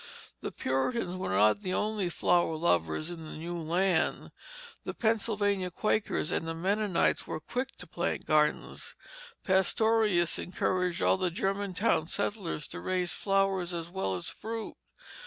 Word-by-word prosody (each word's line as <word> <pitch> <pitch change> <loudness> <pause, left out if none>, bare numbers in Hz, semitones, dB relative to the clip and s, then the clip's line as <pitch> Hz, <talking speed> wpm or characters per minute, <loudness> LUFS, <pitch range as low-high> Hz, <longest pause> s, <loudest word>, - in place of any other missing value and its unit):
The - - -4
Puritans 175 - -1
were 185 - -3
not 105 - +4
the 185 -2 -1
only 210 -4 0
flower 175 -1 +2
lovers 120 - +1
in 165 -2 -7
the 155 - -8
new 170 +2 -5
land. 175 +1 +1 0.5
The - - -5
Pennsylvania 205 -4 +1
Quakers 215 -3 0
and - - 0 0.2
Mennonites 200 0 +1
were - - -3
quick 250 - -4
to - - -10
plant 170 +1 -2
gardens. 150 -1 +1 0.5
Pastorius 190 -1 +3
encouraged 180 -1 -1
all - - +4
the 185 -1 +1
Germantown 195 -2 0
settlers 195 -6 -2
to 180 - -6
raise 180 -1 -1
flowers 195 -3 +1
as 170 0 -5
well 180 - -1
as 90 - -3
fruit. 225 0 -5
185 Hz, 140 wpm, -30 LUFS, 165-205 Hz, 0.5 s, not